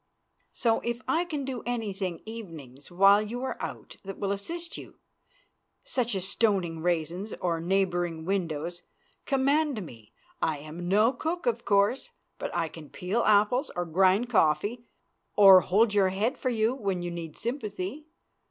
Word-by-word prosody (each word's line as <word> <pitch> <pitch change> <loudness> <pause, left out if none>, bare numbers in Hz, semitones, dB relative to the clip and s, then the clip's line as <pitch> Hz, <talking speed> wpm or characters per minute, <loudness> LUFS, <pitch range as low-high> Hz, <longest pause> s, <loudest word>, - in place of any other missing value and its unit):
So, 230 -2 +1
if 235 0 -3
I 335 +2 +1
can 300 -6 -4
do 255 -3 -4
anything 200 -7 -3
evenings 160 - -9
while 195 +3 +5
you 235 +4 -5
are 265 - -2
out - - -7
that 195 0 -8
will 200 -1 -2
assist 335 +13 -5
you, - - -10 0.9
such 240 -4 -1
as 190 -1 -2
stoning 190 -7 0
raisins 175 +4 -1
or 170 -2 0
neighboring 175 -2 0
windows, 175 -2 -2 0.5
command 275 - +1
me. 115 -7 -14 0.3
I 155 -2 +1
am 155 +4 -7
no 215 +6 +4
cook, 335 +3 -3
of 235 -1 0
course, 200 +5 +2 0.3
but - - -3
I 170 -1 0
can 155 -2 -11
peel 195 +6 -1
apples 215 +7 +3
or 175 0 -1
grind 190 +7 +3
coffee 210 +3 +1 0.5
or 195 -2 +9
hold 205 +4 +2
your 195 -2 +4
head 205 +6 0
for 255 - -2
you 225 0 +1
when 195 -8 -2
you 175 - -3
need 165 -2 -7
sympathy. 230 +2 -4
200 Hz, 155 wpm, -28 LUFS, 175-235 Hz, 0.9 s, or